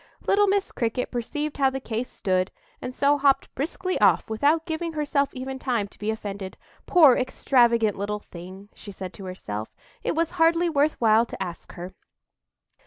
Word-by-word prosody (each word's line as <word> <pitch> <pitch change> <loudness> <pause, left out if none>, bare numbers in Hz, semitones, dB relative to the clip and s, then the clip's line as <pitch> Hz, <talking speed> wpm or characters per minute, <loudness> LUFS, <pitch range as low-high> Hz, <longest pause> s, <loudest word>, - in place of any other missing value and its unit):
Little 410 +1 +4
Miss 390 0 +1
Cricket 235 +1 -2
perceived 290 +5 -3
how 270 -2 +4
the 265 0 -4
case 240 -1 -4
stood, 185 -1 0 0.3
and 250 - -4
so 285 +3 +2
hopped 275 -1 +2
briskly 365 +6 -3
off, - - +4
without 295 +8 +2
giving 330 0 -3
herself 290 -2 0
even 265 +1 -5
time 235 -6 -1
to - - -18
be 210 - -2
offended. 200 -3 -5 0.3
"Poor 305 -9 +7
extravagant 235 -4 +2
little 205 +1 -3
thing!" 190 +1 -11
said 190 -3 -8
she - - -14
to 195 - -9
herself, 110 - -6 0.3
"it - - -1
was 330 0 0
hardly 335 0 +3
worth 295 0 +1
while 225 0 +4
to - - -8
ask 175 -2 -8
her." 180 +1 -8
250 Hz, 175 wpm, -25 LUFS, 205-300 Hz, 0.3 s, Poor